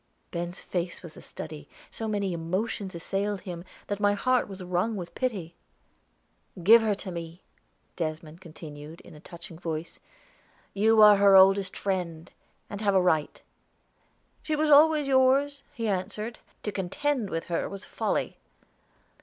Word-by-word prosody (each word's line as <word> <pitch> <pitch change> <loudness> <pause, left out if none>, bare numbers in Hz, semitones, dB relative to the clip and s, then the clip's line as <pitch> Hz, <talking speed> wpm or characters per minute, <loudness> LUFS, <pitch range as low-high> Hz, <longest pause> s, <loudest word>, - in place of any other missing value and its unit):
Ben's 175 +1 -4
face 175 0 -4
was 165 -3 -10
a - - -11
study; 150 -2 -8 0.2
so 225 - -4
many 200 -3 -1
emotions 185 +3 -3
assailed 195 +3 -2
him 175 -2 -7 0.2
that 205 0 -3
my 205 0 +3
heart 255 +4 +1
was 195 -2 -8
wrung 180 +5 -1
with 180 -4 -6
pity. 200 -10 -3 1.1
"Give 225 +5 +8
her 215 -2 +1
to 195 -1 -6
me," 170 0 -7 0.5
Desmond 160 0 -5
continued 155 -2 -10
in - - -15
a 150 - -13
touching 170 0 -11
voice. 165 -1 -5 0.7
"You 215 +2 +5
are 210 -1 +9
her 200 -1 +6
oldest 190 0 +5
friend, 175 -4 -3 0.4
and 205 0 -7
have 200 -2 +2
a - - +6
right." 160 -5 0 1.0
"She 310 - -1
was 305 0 +1
always 300 +1 +6
yours," 275 +2 +3
he 230 -6 -3
answered. 210 +4 -3 0.2
"To 210 - -2
contend 210 +5 -1
with 165 -1 -3
her 170 - -2
was 195 0 -7
folly." - - -2
195 Hz, 150 wpm, -27 LUFS, 170-215 Hz, 1.1 s, are